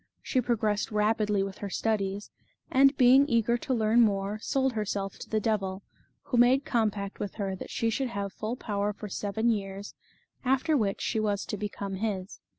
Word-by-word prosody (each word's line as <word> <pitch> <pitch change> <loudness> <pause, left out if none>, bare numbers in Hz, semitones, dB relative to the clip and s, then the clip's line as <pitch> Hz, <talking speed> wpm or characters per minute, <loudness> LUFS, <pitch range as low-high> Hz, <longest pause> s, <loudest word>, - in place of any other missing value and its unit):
She 255 - +1
progressed 215 -4 0
rapidly 210 -1 +1
with 195 -1 -6
her 200 - -4
studies, 200 -1 -1 0.4
and 275 +1 +5
being 260 +3 +6
eager 235 -1 +2
to - - -5
learn 225 -1 +4
more, 205 -1 +1
sold 265 +3 0
herself 200 -2 -3
to - - -9
the 215 - +1
devil, 195 -3 -1 0.4
who 250 - -2
made 255 +4 +5
compact 210 -5 -1
with 205 - -4
her 195 -3 -2
that - - -8
she 230 0 0
should 265 +4 -1
have 200 -3 -4
full 220 +3 -3
power 205 -4 -2
for 210 - -8
seven 220 +4 0
years, 200 -1 -4 0.5
after 270 +4 +2
which 210 -7 0
she 220 - 0
was 205 -2 0
to - - -3
become 200 -1 -4
his. 200 -2 -3
215 Hz, 180 wpm, -28 LUFS, 200-235 Hz, 0.5 s, being